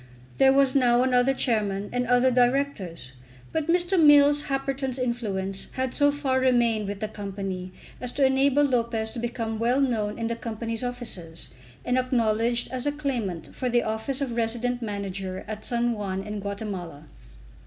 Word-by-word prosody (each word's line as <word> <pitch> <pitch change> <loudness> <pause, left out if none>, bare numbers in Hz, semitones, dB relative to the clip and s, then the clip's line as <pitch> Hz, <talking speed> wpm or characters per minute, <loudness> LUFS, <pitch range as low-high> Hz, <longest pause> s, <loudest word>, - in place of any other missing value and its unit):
There 270 0 +7
was 275 -1 +3
now 245 -2 +4
another 255 0 +3
Chairman 205 -5 0
and 245 0 0
other 245 +1 +4
Directors; 245 - 0 0.4
but 320 -1 -1
Mr. 350 +1 +3
Mills 290 0 +6
Happerton's 270 -1 -2
influence 205 -6 -2
had 260 -1 -2
so 285 -1 +4
far 280 -2 0
remained 235 -5 +2
with 200 -1 -5
the 215 - -1
Company 195 -3 -5 0.3
as 250 -1 -2
to 275 - +3
enable 270 +2 +3
Lopez 235 -4 0
to 240 - -6
become 230 -2 -3
well 240 +4 +2
known 220 -6 0
in 230 - -3
the 230 0 -1
Company's 230 0 -4
offices, 225 -10 -4 0.4
and 250 +1 +2
acknowledged 235 -1 +1
as 255 +2 -3
a - - +2
claimant 245 - -3
for 255 - -2
the 240 0 +2
office 220 +6 -2
of 250 -4 -2
resident 240 +2 -1
Manager 195 -3 -4
at 215 0 -6
San 240 0 +1
Juan 195 -3 -3
in 210 0 -5
Guatemala. 195 -7 -6
240 Hz, 165 wpm, -26 LUFS, 210-260 Hz, 0.4 s, There